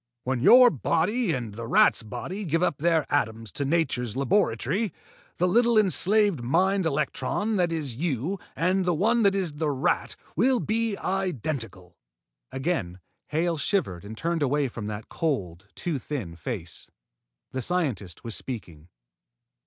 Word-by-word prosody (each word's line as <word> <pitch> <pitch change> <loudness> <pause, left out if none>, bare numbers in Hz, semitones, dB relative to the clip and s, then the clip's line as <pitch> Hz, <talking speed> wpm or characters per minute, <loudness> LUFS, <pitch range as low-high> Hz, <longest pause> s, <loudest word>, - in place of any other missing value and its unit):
When 130 -1 -1
your 245 - +8
body 180 - +1
and 120 -7 -3
the 115 +2 -6
rat's - - +4
body 180 - -6
give 165 -1 0
up 145 - 0
their 160 -1 +2
atoms 110 -6 -1
to 140 - -3
nature's 135 -7 0
laboratory, 165 - +1 0.5
the 180 - +2
little 235 +4 +4
enslaved 205 - +3
mind 185 +8 +2
electron 200 +8 -1
that 175 -2 +2
is 145 -8 -3
you 165 - -1 0.2
and 185 +3 +1
the 175 -2 +1
one 225 +8 +2
that 200 -2 +4
is 185 -6 -1
the 150 +1 -1
rat 135 -2 0 0.2
will 245 - +3
be 225 -2 -1
identical." 135 - -3 0.5
Again 130 - -2 0.3
Hale 165 +2 0
shivered 145 - -1
and 110 +2 -8
turned 165 +2 -1
away 145 0 +2
from 115 -3 -6
that 105 0 -6
cold, 100 - -3
too 165 -6 -2
thin 115 - -5
face. 90 -4 -6 0.6
The 130 - -3
scientist 125 - -2
was 115 - -2
speaking. 90 - -7
155 Hz, 145 wpm, -26 LUFS, 115-185 Hz, 0.6 s, your